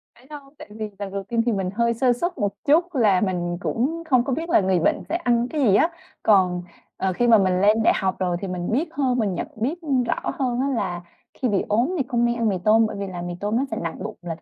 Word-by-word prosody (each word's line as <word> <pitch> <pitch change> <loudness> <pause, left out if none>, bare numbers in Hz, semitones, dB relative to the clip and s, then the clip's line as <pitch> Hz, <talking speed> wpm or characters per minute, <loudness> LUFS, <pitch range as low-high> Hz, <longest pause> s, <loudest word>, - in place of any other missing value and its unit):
Phải 245 - -21
đâu, 295 - -7 0.2
tại - - -11
vì 215 -1 -4
lần 200 -1 -5
đầu 200 0 -4
tiên 230 +3 0
thì 240 - +2
mình 195 -3 -1
hơi 235 0 +2
sơ 245 +2 +2
suất 345 +9 -3
một 200 -1 -1
chút 335 +3 +3
là 210 -7 +3
mình 175 -3 -1
cũng 320 +8 -1
không 250 -3 +4
có 270 - -2
biết 325 +5 -3
là 345 - +5
người 185 -2 +2
bệnh - - +1
sẽ - - -1
ăn 240 -8 +1
cái 305 -2 -2
gì 205 -7 +4
á. 325 - +4 0.3
Còn, 180 -4 +3 0.3
ờ, 190 -1 -1
khi 240 +6 +1
mà 230 -2 +7
mình 185 -1 +2
lên 215 +2 +4
đại - - +5
học 190 -1 -1
rồi 180 -2 0
thì 195 - -4
mình 180 0 -3
biết 300 +9 0
hơn 260 -3 0
mình 205 -4 0
nhận - - -3
biết, 280 +11 -3
ưm, 270 -5 +1
rõ - - -2
hơn 250 -2 0
á, 275 - +1
là 175 -6 -2 0.3
khi 255 - -2
bị 200 - +1
ốm 240 - +1
thì 275 - +1
không 240 -1 +1
nên 235 0 +1
ăn 230 -2 +1
mì 190 - 0
tôm 220 +1 +5
bởi - - -4
vì 200 - -3
là 180 -2 -6
mì 175 0 -4
tôm 210 +3 -1
nó 260 - +1
sẽ - - -2
nặng 165 -1 -5
bụng - - -6
là 170 -2 -5
225 Hz, 285 wpm, -23 LUFS, 190-255 Hz, 0.3 s, mà